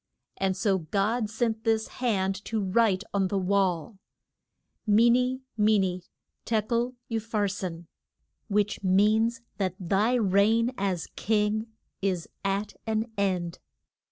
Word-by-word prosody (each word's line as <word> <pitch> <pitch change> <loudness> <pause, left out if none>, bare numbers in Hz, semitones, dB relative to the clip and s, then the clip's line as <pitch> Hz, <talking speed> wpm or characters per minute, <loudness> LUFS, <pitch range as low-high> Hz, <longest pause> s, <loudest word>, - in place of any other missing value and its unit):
And 190 -1 0
so 195 -1 +2
God 205 +7 0
sent 220 0 -1
this 220 -1 +1
hand 195 -5 0
to 225 - -1
write 200 0 +2
on 195 -1 +2
the 200 - -1
wall. 190 0 0 0.9
ME 225 +3 +6
NE, 250 +2 +1 0.2
ME 215 0 +4
NE, 185 -2 0 0.4
TE 225 -1 +1
KEL, 240 +3 -1
U 225 -1 0
PHAR 215 -2 -1
SIN, 180 -4 -5 0.6
which 210 -1 0
means 215 +5 +3 0.2
that 185 -2 0
thy 200 +7 +2
reign 220 +2 +3
as 190 -5 -1
king 215 +1 0 0.3
is 185 -4 -1 0.2
at 200 +1 -1
an 220 +1 -1
end. 185 -4 -1
205 Hz, 130 wpm, -27 LUFS, 190-225 Hz, 0.9 s, ME